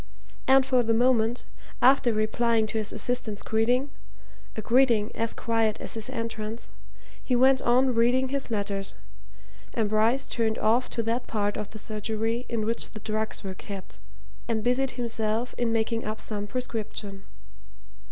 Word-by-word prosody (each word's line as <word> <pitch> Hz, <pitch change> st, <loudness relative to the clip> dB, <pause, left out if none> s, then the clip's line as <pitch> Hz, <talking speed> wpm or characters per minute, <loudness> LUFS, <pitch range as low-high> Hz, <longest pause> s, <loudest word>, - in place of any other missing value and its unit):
And 265 Hz, 0 st, +6 dB
for 255 Hz, -2 st, +3 dB
the 225 Hz, -1 st, +1 dB
moment, 240 Hz, -1 st, +2 dB, 0.4 s
after 260 Hz, -1 st, +5 dB
replying 220 Hz, +1 st, +1 dB
to 220 Hz, +1 st, -2 dB
his 215 Hz, -, 0 dB
assistant's 225 Hz, -4 st, 0 dB
greeting 245 Hz, +5 st, +1 dB, 0.7 s
a -, -, -1 dB
greeting 235 Hz, -3 st, +3 dB
as 230 Hz, 0 st, -2 dB
quiet 225 Hz, -2 st, 0 dB
as -, -, 0 dB
his 225 Hz, -1 st, -1 dB
entrance 225 Hz, 0 st, -5 dB, 0.5 s
he 250 Hz, -, +1 dB
went 260 Hz, +1 st, +5 dB
on 255 Hz, +2 st, +3 dB
reading 245 Hz, +3 st, +2 dB
his 275 Hz, -1 st, -2 dB
letters, 200 Hz, -3 st, -2 dB, 0.8 s
and 220 Hz, -3 st, +1 dB
Bryce 225 Hz, +5 st, +2 dB
turned 225 Hz, -2 st, 0 dB
off 235 Hz, +4 st, +2 dB
to 230 Hz, -, -2 dB
that 230 Hz, +2 st, -1 dB
part 205 Hz, -2 st, -1 dB
of 210 Hz, -1 st, -5 dB
the 215 Hz, -, -6 dB
surgery 220 Hz, +3 st, -2 dB
in 225 Hz, -3 st, -1 dB
which 230 Hz, +1 st, -2 dB
the 215 Hz, -, -9 dB
drugs 215 Hz, +1 st, -3 dB
were 190 Hz, -1 st, -4 dB
kept, 195 Hz, 0 st, -9 dB, 0.5 s
and 225 Hz, -2 st, -1 dB
busied 250 Hz, +3 st, +2 dB
himself 230 Hz, 0 st, -1 dB
in 240 Hz, -2 st, 0 dB
making 225 Hz, 0 st, 0 dB
up 215 Hz, +1 st, -4 dB
some 205 Hz, -1 st, -4 dB
prescription. 215 Hz, -4 st, -5 dB
225 Hz, 155 wpm, -27 LUFS, 215-245 Hz, 0.8 s, And